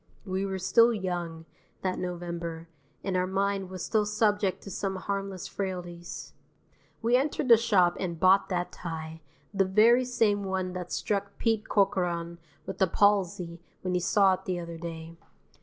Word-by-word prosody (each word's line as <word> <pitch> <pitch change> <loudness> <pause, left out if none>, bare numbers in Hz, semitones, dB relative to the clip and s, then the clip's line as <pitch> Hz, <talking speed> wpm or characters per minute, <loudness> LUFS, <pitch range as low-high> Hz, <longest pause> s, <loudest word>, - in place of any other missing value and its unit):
(We 190 0 -1
were 190 -1 -3
still 230 +5 +5
young, 175 -6 -3 0.4
that 185 -1 -1
November, 170 -2 -5 0.4
and 190 -2 -2
our 180 0 +1
mind 195 0 -1
was 185 -1 -5
still 215 -2 +1
subject 205 -3 +1
to 195 - -8
some 195 +1 -2
harmless 195 -1 -4
frailties.) 175 -3 -6 0.7
We 235 +2 +4
entered 275 0 0
the 230 - +11
shop 200 -6 +3
and 170 -3 -3
bought 185 +3 +5
that 180 -2 -1
tie, 160 -1 -6 0.3
the 195 -1 +3
very 225 +6 +5
same 215 -5 +1
one 190 -1 -2
that 180 -1 -6
struck 200 -1 -2
Pete 225 -2 0
Corcoran 175 -4 +1 0.3
with 190 +1 -7
a 190 - +5
palsy 180 -3 +1 0.2
when 185 -1 -1
he 180 - +2
saw 190 +2 +4
it 185 - -5
the 180 -1 -2
other 170 -1 -7
day. 165 0 -7
185 Hz, 160 wpm, -28 LUFS, 175-200 Hz, 0.7 s, the